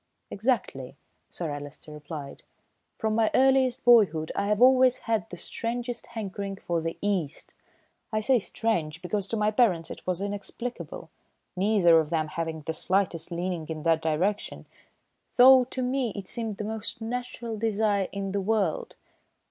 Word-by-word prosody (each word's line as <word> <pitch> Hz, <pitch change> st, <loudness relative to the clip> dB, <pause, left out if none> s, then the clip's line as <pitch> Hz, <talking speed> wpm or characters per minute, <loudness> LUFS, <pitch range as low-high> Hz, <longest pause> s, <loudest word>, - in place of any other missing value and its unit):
"Exactly," 195 Hz, -, -1 dB, 0.3 s
Sir 165 Hz, -4 st, -4 dB
Alister 145 Hz, +1 st, -8 dB
replied. 150 Hz, -1 st, -8 dB, 0.5 s
"From 220 Hz, -1 st, -1 dB
my 220 Hz, 0 st, +3 dB
earliest 265 Hz, -1 st, +3 dB
boyhood 195 Hz, -10 st, +5 dB
I 200 Hz, -, 0 dB
have 210 Hz, 0 st, +1 dB
always 255 Hz, 0 st, +6 dB
had 220 Hz, -6 st, 0 dB
the 175 Hz, -, -8 dB
strangest 235 Hz, +5 st, -4 dB
hankering 200 Hz, -3 st, -5 dB
for 170 Hz, -3 st, -2 dB
the 165 Hz, 0 st, -4 dB
East. 185 Hz, -8 st, -2 dB, 0.6 s
I 215 Hz, -, +1 dB
say 255 Hz, +3 st, +3 dB
strange, 170 Hz, -8 st, -2 dB
because 200 Hz, +2 st, -2 dB
to 225 Hz, -, -2 dB
my 210 Hz, 0 st, +2 dB
parents 200 Hz, -8 st, +2 dB
it -, -, -8 dB
was 180 Hz, -1 st, 0 dB
inexplicable, 205 Hz, +5 st, -6 dB, 0.4 s
neither 185 Hz, -4 st, +5 dB
of 155 Hz, -2 st, -1 dB
them 155 Hz, -2 st, 0 dB
having 160 Hz, 0 st, -4 dB
the 160 Hz, +2 st, -4 dB
slightest 180 Hz, -1 st, 0 dB
leaning 175 Hz, -2 st, -3 dB
in 155 Hz, -1 st, -5 dB
that 165 Hz, -1 st, +3 dB
direction, 175 Hz, +7 st, -1 dB, 0.7 s
though 255 Hz, 0 st, +8 dB
to 255 Hz, +1 st, -3 dB
me 250 Hz, -3 st, -1 dB
it 200 Hz, -2 st, -6 dB
seemed 225 Hz, -4 st, -4 dB
the -, -, -4 dB
most 220 Hz, +1 st, -4 dB
natural 240 Hz, 0 st, -4 dB
desire 210 Hz, -3 st, +1 dB
in 195 Hz, -1 st, -4 dB
the 200 Hz, 0 st, -1 dB
world. 200 Hz, -5 st, -1 dB
200 Hz, 155 wpm, -27 LUFS, 165-230 Hz, 0.7 s, though